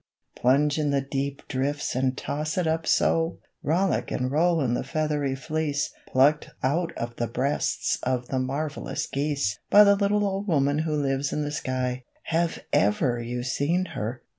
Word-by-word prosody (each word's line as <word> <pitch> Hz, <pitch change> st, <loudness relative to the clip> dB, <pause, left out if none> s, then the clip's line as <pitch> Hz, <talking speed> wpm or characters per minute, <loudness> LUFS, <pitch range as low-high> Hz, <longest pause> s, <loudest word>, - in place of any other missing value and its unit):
Plunge 145 Hz, +4 st, +3 dB
in 150 Hz, -1 st, +1 dB
the 140 Hz, -1 st, +2 dB
deep 140 Hz, 0 st, -3 dB
drifts 140 Hz, +2 st, -1 dB
and 130 Hz, +1 st, 0 dB
toss 155 Hz, +3 st, -3 dB
it 180 Hz, -, +1 dB
up 160 Hz, 0 st, 0 dB
so! 165 Hz, 0 st, +2 dB, 0.3 s
Rollick 175 Hz, +5 st, +1 dB
and 130 Hz, +1 st, -1 dB
roll 165 Hz, +3 st, +3 dB
in 125 Hz, -5 st, +1 dB
the -, -, -1 dB
feathery 150 Hz, -3 st, -1 dB
fleece 150 Hz, +1 st, -2 dB
Plucked 145 Hz, +4 st, +3 dB
out 165 Hz, +6 st, +1 dB
of 120 Hz, 0 st, -5 dB
the 120 Hz, -, -1 dB
breasts 130 Hz, +5 st, 0 dB
of 125 Hz, -1 st, -1 dB
the 130 Hz, -, 0 dB
marvelous 140 Hz, +4 st, -3 dB
geese 140 Hz, -7 st, -1 dB
By 210 Hz, -, +9 dB
the 200 Hz, -1 st, +6 dB
little 205 Hz, +1 st, +2 dB
old 195 Hz, +1 st, -2 dB
woman 145 Hz, -3 st, +2 dB
who 155 Hz, -1 st, 0 dB
lives 140 Hz, -1 st, 0 dB
in 150 Hz, -, -1 dB
the 145 Hz, -, -3 dB
sky; 130 Hz, -3 st, -2 dB, 0.2 s
Have 165 Hz, +1 st, -1 dB
ever 140 Hz, -, +2 dB
you 120 Hz, +1 st, -4 dB
seen 165 Hz, +8 st, 0 dB
her? 120 Hz, -1 st, -4 dB
145 Hz, 170 wpm, -26 LUFS, 130-160 Hz, 0.3 s, By